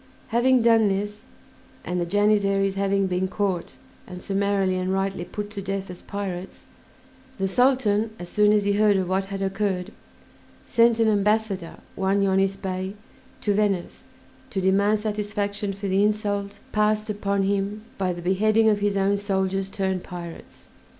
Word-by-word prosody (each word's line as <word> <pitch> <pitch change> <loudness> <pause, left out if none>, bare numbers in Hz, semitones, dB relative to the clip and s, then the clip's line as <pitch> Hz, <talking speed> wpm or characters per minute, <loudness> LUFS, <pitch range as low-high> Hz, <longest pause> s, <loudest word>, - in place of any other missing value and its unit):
Having 245 +1 +3
done 225 -2 +5
this, 205 +2 -3 0.6
and 180 0 -1
the 170 - -2
Janissaries 200 0 +2
having 195 0 +1
been 185 0 0
caught 190 -2 -2 0.3
and 180 - -8
summarily 195 -1 0
and 185 0 -1
rightly 195 -2 -1
put 205 +3 -6
to 200 -2 -5
death 195 -1 -4
as 180 - -8
pirates, 190 -3 -6 0.7
the 195 - 0
Sultan, 225 -1 +2
as 175 - -8
soon 210 +3 +3
as 210 -1 +3
he 200 0 +1
heard 205 -1 +4
of 185 -1 -1
what 190 +1 0
had 195 0 -4
occurred, 195 -1 -1 0.7
sent 230 0 +4
an 225 -1 +3
ambassador, 210 -3 +1 0.2
one 195 +1 +1
Yonis 195 0 +2
Bey, 190 0 -4 0.5
to 205 - +1
Venice 200 -3 -1 0.5
to 195 - -2
demand 200 +3 +3
satisfaction 205 -1 -2
for 200 +1 -5
the 195 +1 +2
insult 205 -1 -1
passed 215 0 +1
upon 200 -1 -1
him 200 +2 -1 0.2
by 185 -2 +1
the 175 -1 -6
beheading 215 +4 +3
of 210 -1 +2
his 205 -1 0
own 195 +1 +2
soldiers 195 -1 -1
turned 190 -2 -2
pirates. 170 -2 -9
200 Hz, 155 wpm, -24 LUFS, 190-210 Hz, 0.7 s, done